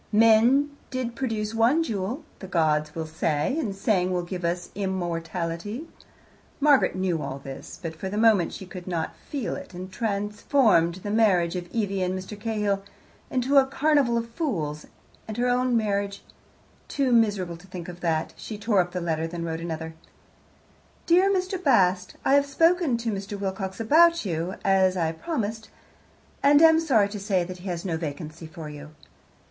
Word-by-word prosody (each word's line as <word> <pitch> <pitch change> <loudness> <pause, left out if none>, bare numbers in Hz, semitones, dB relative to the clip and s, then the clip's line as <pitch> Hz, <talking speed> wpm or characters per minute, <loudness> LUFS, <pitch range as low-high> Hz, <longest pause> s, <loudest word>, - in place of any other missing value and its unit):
"Men 230 +7 +5
did 255 -2 -3
produce 225 -4 -2
one 240 +9 +3
jewel," 225 +3 -3 0.2
the 190 - -8
gods 155 -4 +1
will 160 -1 -3
say, 155 - -1
and, 210 -11 -2
saying, 190 -2 +1
will 180 -1 0
give 180 0 -6
us 175 +1 -2
immortality. 180 - -3 0.7
Margaret 285 -7 +4
knew 185 -4 0
all 135 - -4
this, 135 -1 -9
but 165 -3 -6
for 190 +4 -5
the 205 - -4
moment 215 -5 +4
she 190 - -8
could 180 -1 -9
not 170 -3 -3
feel 275 -7 -4
it, - - -9
and 185 +1 -7
transformed 205 - +2
the 205 - -3
marriage 190 -6 +3
of 175 -1 -5
Evie 200 -4 -1
and 185 +1 0
Mr. 185 +3 -7
Cahill 210 -3 -1 0.5
into 260 +2 +1
a 265 - +2
carnival 275 -3 +2
of 230 0 -3
fools, 165 - -3 0.4
and 215 0 -6
her 245 +1 +1
own 250 0 +2
marriage 200 -2 -1 0.6
too 275 -3 0
miserable 205 -7 +2
to 185 +4 -17
think 180 -3 -7
of 175 -1 -8
that, 160 -2 -1
she 215 - -7
tore 210 -1 +1
up 175 0 -5
the 180 - -2
letter, 160 -2 -1
and 165 0 -3
then 170 -1 -4
wrote 165 -1 -3
another: 160 -1 -5 1.1
Dear 365 +3 +4
Mr. 370 -1 -1
Bast, 185 - +3
I 270 - +4
have 280 0 +4
spoken 330 -2 +3
to 230 -1 -2
Mr. 200 0 -5
Wilcox 190 0 -4
about 335 +6 +5
you, 175 +1 -2
as 190 -1 +3
I 165 -2 +1
promised, 220 - -4 0.7
and 285 +1 +6
am 320 0 +7
sorry 230 -11 +3
to 205 0 -6
say 195 -3 +1
that 180 +1 -8
he 185 - -9
has 170 0 -4
no 165 -4 -1
vacancy 160 +1 -6
for 160 0 -9
you. 150 +1 -10
200 Hz, 175 wpm, -25 LUFS, 175-235 Hz, 1.1 s, am